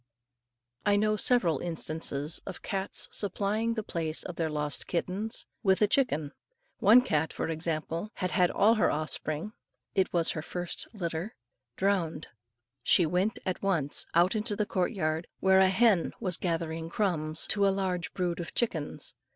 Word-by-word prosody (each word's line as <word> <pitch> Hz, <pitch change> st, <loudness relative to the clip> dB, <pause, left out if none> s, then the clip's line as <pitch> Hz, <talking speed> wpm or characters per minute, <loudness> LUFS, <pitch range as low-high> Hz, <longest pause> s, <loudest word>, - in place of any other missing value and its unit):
I 205 Hz, 0 st, +3 dB
know 215 Hz, +1 st, +2 dB
several 195 Hz, -, +3 dB
instances 160 Hz, -3 st, 0 dB
of -, -, -7 dB
cats 195 Hz, -1 st, -1 dB
supplying 210 Hz, +3 st, 0 dB
the 220 Hz, -, -2 dB
place 160 Hz, -4 st, -2 dB
of 180 Hz, -, -7 dB
their 165 Hz, -2 st, -1 dB
lost 150 Hz, -1 st, -2 dB
kittens 190 Hz, +6 st, -2 dB, 0.2 s
with 190 Hz, -3 st, +3 dB
a 210 Hz, -, +5 dB
chicken. 205 Hz, -, +1 dB, 0.5 s
One 225 Hz, +3 st, +7 dB
cat, 160 Hz, -10 st, 0 dB
for -, -, -3 dB
example, 165 Hz, +3 st, -3 dB
had 185 Hz, -1 st, -2 dB
had 180 Hz, -1 st, +3 dB
all 220 Hz, +3 st, +4 dB
her 220 Hz, -, +2 dB
offspring, 155 Hz, +5 st, -2 dB, 0.4 s
it 190 Hz, -2 st, +1 dB
was 170 Hz, -2 st, +1 dB
her 155 Hz, -, -4 dB
first 175 Hz, +2 st, -4 dB
litter, 175 Hz, -1 st, -4 dB, 0.4 s
drowned; 185 Hz, -6 st, -1 dB, 0.5 s
she 175 Hz, -, +4 dB
went 180 Hz, +6 st, 0 dB
at 185 Hz, -, -2 dB
once 170 Hz, -8 st, +1 dB
out 175 Hz, +5 st, +4 dB
into 215 Hz, 0 st, 0 dB
the 210 Hz, -, 0 dB
court 185 Hz, -1 st, 0 dB
yard, 160 Hz, -5 st, -2 dB
where 190 Hz, 0 st, +5 dB
a 190 Hz, 0 st, +6 dB
hen 195 Hz, -2 st, +3 dB
was 185 Hz, -6 st, 0 dB
gathering 165 Hz, -2 st, -2 dB
crumbs 160 Hz, -5 st, -1 dB
to 200 Hz, -1 st, +3 dB
a -, -, +5 dB
large 190 Hz, -3 st, -1 dB
brood 175 Hz, -2 st, -1 dB
of 170 Hz, +1 st, -6 dB
chickens. 165 Hz, -11 st, -1 dB
180 Hz, 160 wpm, -29 LUFS, 160-205 Hz, 0.5 s, One